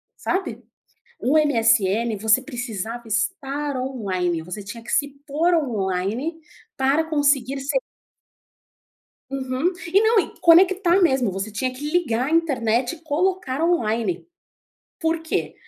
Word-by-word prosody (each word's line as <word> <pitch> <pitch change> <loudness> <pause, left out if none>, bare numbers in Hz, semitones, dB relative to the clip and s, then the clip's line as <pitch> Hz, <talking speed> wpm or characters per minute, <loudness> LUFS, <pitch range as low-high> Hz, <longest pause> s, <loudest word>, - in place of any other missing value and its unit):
sabe? 380 +1 -3 0.6
O 280 +5 +2
MSN, 230 -6 +2
você 220 +4 +3
precisava 240 -3 -5
estar 275 - -2
online, 190 -10 -2
você 180 +5 -7
tinha 230 +4 -8
que - - -9
se 285 - +2 0.2
pôr 325 +5 +1
online 230 - -1 0.4
para 275 +4 +2
conseguir 280 -4 +1
se 275 - -2 1.5
Uhum. 265 +5 -1 0.2
E 395 - +6
não, 440 0 +4
e - - -7
conectar 360 +2 +5
mesmo, 265 - +3
você 195 +3 -4
tinha 255 +5 -2
que 290 +4 -5
ligar 260 -8 +1
a - - -4
internet 255 -7 +1
e - - -20
colocar 330 -2 -1
online, 225 - 0 0.7
por 325 -1 0
quê? 320 0 -3
265 Hz, 125 wpm, -22 LUFS, 225-320 Hz, 1.5 s, E